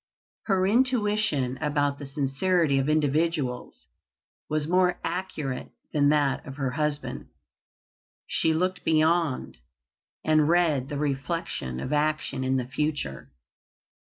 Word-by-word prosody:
Her 190 Hz, -3 st, +2 dB
intuition 210 Hz, -, +1 dB
about 145 Hz, -2 st, 0 dB
the 145 Hz, -, -7 dB
sincerity 140 Hz, +2 st, +1 dB
of 135 Hz, +2 st, 0 dB
individuals 150 Hz, -3 st, 0 dB, 0.6 s
was 155 Hz, -1 st, -1 dB
more 180 Hz, 0 st, +2 dB
accurate 155 Hz, -8 st, -3 dB, 0.2 s
than 145 Hz, -1 st, +4 dB
that 145 Hz, -3 st, +2 dB
of 135 Hz, -, -8 dB
her 135 Hz, -3 st, -2 dB
husband. 150 Hz, +1 st, -3 dB, 1.0 s
She 160 Hz, -, +1 dB
looked 180 Hz, +3 st, 0 dB
beyond, 160 Hz, -, +1 dB, 0.7 s
and 155 Hz, -1 st, +4 dB
read 160 Hz, -6 st, +2 dB
the 145 Hz, -, -3 dB
reflection 140 Hz, -, -2 dB
of 130 Hz, -, -3 dB
action 150 Hz, -3 st, 0 dB
in 130 Hz, 0 st, +1 dB
the 125 Hz, -, -1 dB
future. 135 Hz, -, -3 dB
150 Hz, 115 wpm, -26 LUFS, 135-170 Hz, 1.0 s, than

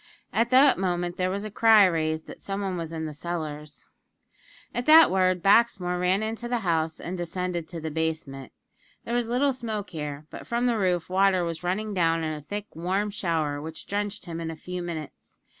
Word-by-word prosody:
At 230 Hz, +2 st, +2 dB
that 265 Hz, -3 st, +6 dB
moment 175 Hz, -1 st, -1 dB
there 185 Hz, 0 st, +1 dB
was 200 Hz, +2 st, -3 dB
a 215 Hz, -, -6 dB
cry 220 Hz, -1 st, +6 dB
raised 160 Hz, -2 st, 0 dB
that -, -, -11 dB
some 195 Hz, 0 st, -4 dB
one 190 Hz, -2 st, -2 dB
was 165 Hz, -2 st, -5 dB
in 160 Hz, -1 st, -4 dB
the 155 Hz, -, -5 dB
cellars. 150 Hz, -2 st, -6 dB, 0.8 s
At 240 Hz, -, -3 dB
the 320 Hz, +1 st, +9 dB
word, 185 Hz, -2 st, +1 dB
Baxmore 195 Hz, -4 st, +3 dB
ran 185 Hz, +3 st, +2 dB
into 225 Hz, +2 st, -4 dB
the 240 Hz, -1 st, -1 dB
house, 160 Hz, -2 st, 0 dB
and 180 Hz, -, -5 dB
descended 175 Hz, -1 st, -3 dB
to 170 Hz, -1 st, -7 dB
the 160 Hz, 0 st, -4 dB
basement. 155 Hz, -4 st, -3 dB, 0.5 s
There 235 Hz, -, -3 dB
was 240 Hz, -1 st, 0 dB
little 265 Hz, +3 st, +2 dB
smoke 220 Hz, -5 st, -4 dB
here; 150 Hz, -2 st, -5 dB
but -, -, -9 dB
from 235 Hz, +1 st, 0 dB
the 235 Hz, -3 st, +1 dB
roof, 180 Hz, -3 st, +1 dB
water 185 Hz, 0 st, +3 dB
was 165 Hz, -2 st, -4 dB
running 210 Hz, +4 st, -1 dB
down 165 Hz, -3 st, +2 dB
in 155 Hz, 0 st, -2 dB
a 150 Hz, -, -6 dB
thick, 205 Hz, +8 st, -5 dB
warm 190 Hz, +5 st, -1 dB
shower, 160 Hz, -7 st, -1 dB
which 160 Hz, +1 st, -8 dB
drenched 205 Hz, 0 st, -3 dB
him 170 Hz, -1 st, -5 dB
in 165 Hz, -, -3 dB
a 165 Hz, -, -5 dB
few 180 Hz, +3 st, -6 dB
minutes. 165 Hz, -4 st, -8 dB
180 Hz, 205 wpm, -26 LUFS, 160-205 Hz, 0.8 s, the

